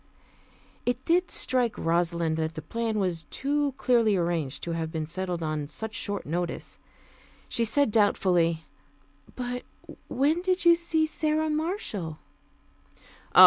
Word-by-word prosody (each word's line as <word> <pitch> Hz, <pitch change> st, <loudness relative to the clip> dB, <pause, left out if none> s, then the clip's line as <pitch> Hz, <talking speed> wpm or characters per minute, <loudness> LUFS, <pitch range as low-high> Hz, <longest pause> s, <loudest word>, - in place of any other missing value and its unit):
It 245 Hz, +1 st, -1 dB
did 355 Hz, +2 st, +3 dB
strike 250 Hz, -3 st, +1 dB
Rosalind 170 Hz, -1 st, +1 dB
that 160 Hz, 0 st, -2 dB
the 160 Hz, -, -6 dB
plan 230 Hz, +4 st, -2 dB
was 175 Hz, -5 st, -1 dB
too 285 Hz, 0 st, 0 dB
clearly 230 Hz, -5 st, +3 dB
arranged 170 Hz, -6 st, -1 dB
to 170 Hz, -, -2 dB
have 165 Hz, -1 st, -2 dB
been 160 Hz, -1 st, -2 dB
settled 180 Hz, +1 st, -3 dB
on 155 Hz, -2 st, -2 dB
such 220 Hz, +8 st, -5 dB
short 205 Hz, -4 st, -2 dB
notice. 170 Hz, +3 st, -3 dB, 0.7 s
She 235 Hz, -, +1 dB
said 255 Hz, +2 st, +3 dB
doubtfully, 175 Hz, -6 st, +3 dB, 0.7 s
"But 245 Hz, 0 st, -3 dB, 0.5 s
when 295 Hz, +7 st, +2 dB
did 365 Hz, -1 st, 0 dB
you 340 Hz, -, +9 dB
see 335 Hz, -2 st, +2 dB
Sara 310 Hz, 0 st, 0 dB
Marshall?" 300 Hz, -, -2 dB
210 Hz, 130 wpm, -27 LUFS, -, 0.7 s, you